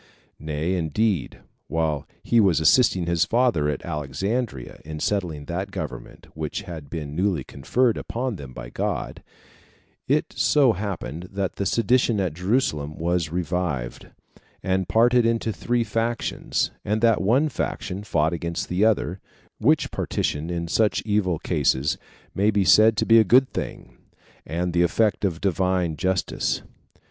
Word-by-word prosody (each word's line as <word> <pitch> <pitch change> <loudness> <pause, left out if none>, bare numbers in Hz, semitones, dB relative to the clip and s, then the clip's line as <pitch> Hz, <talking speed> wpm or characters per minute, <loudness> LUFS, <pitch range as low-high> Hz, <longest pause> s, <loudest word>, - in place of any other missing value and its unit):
Nay, 75 +3 -2
indeed, 90 - -1 0.3
while 80 -3 -1 0.2
he 120 - +3
was 95 -8 +4
assisting 90 +2 +4
his 85 -1 +2
father 115 -8 +2
at 75 - -4
Alexandria, 95 - -3
in 75 0 -7
settling 85 -6 -2
that - - -3
government - - -7
which 80 +5 -4
had 80 -7 -8
been 75 -3 -5
newly 90 -5 0
conferred 115 - 0
upon 125 0 -3
them 70 -7 -9
by - - -9
God, - - -3 0.9
it - - +1
so 140 -6 +4
happened 90 -4 -5
that 100 -1 -3
the 100 - 0
sedition 120 -1 +2
at 90 -5 -1
Jerusalem 85 - -1
was 85 -1 0
revived, 85 -8 -3 0.6
and 95 0 0
parted 120 +2 +4
into 115 -1 0
three 120 +4 0
factions, 115 +2 -1
and 105 +2 0
that 115 -2 +4
one 125 +10 +3
faction 100 -7 -4
fought 80 -5 +1
against 85 0 -3
the 90 +3 +1
other; 105 -4 +1 0.4
which - - +2
partition 75 +3 -2
in 85 -1 -3
such 105 +5 +1
evil 105 -5 +1
cases 75 -3 0 0.3
may 100 +2 +2
be 105 -2 +2
said 110 +3 +6
to - - +1
be 115 0 +7
a - - +6
good 130 +6 +4
thing, - - -6 0.5
and 85 +3 -2
the 85 - +3
effect 105 +6 +2
of 90 -5 0
Divine 90 -3 0
justice. 95 +4 -1
90 Hz, 145 wpm, -24 LUFS, 80-110 Hz, 0.9 s, be